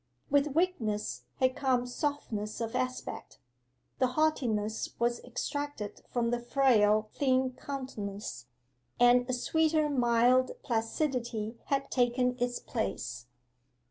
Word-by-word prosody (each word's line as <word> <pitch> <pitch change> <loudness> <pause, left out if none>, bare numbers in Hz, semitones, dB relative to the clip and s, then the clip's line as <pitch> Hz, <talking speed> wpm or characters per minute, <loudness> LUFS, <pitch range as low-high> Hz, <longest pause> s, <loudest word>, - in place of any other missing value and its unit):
With 285 0 +3
weakness 235 - 0
had 255 -1 +3
come 255 -3 +1
softness 245 -5 -3
of 230 +1 -3
aspect: 255 0 -3 0.6
the 255 - +4
haughtiness 225 -9 0
was 235 0 0
extracted 285 -3 -4
from 235 -1 +1
the 240 - 0
frail 220 -4 +3
thin 260 -2 +2
countenance, 210 - -6 0.5
and 245 +1 +5
a - - +1
sweeter 310 +4 +2
mild 245 0 +3
placidity 230 -2 -1
had 275 0 -1
taken 250 0 +2
its 245 0 0
place. 125 - -4
245 Hz, 110 wpm, -30 LUFS, 225-275 Hz, 0.6 s, and